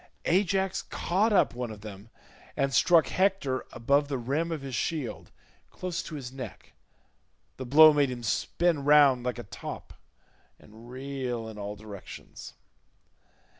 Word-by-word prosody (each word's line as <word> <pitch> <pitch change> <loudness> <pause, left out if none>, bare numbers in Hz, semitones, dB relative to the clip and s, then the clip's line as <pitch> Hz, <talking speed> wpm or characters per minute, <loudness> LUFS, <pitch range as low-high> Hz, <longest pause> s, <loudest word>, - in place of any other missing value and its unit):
Ajax 190 +1 +1
caught 200 +6 0
up 200 - +3
one 125 -1 -4
of 105 -2 -9
them 105 0 -10 0.5
and 135 0 0
struck 165 -3 +4
Hector 185 -9 0
above 140 +5 +1
the 140 -2 -2
rim 140 +8 -2
of 155 -4 -4
his 135 -1 -6
shield 145 -1 -3 0.4
close 180 -2 -4
to 155 - -8
his 130 -3 -7
neck; 125 -7 -9 0.8
the 130 - -6
blow 155 +4 +8
made 145 -2 +2
him 125 -1 -6
spin 165 +6 0
round 140 -4 +5
like 125 0 -2
a 120 - -6
top 95 - -8 0.6
and 110 +3 -16
reel 130 -3 -4
in 110 -1 -9
all 105 0 -5
directions. 105 -2 -11
135 Hz, 145 wpm, -28 LUFS, 120-160 Hz, 0.8 s, blow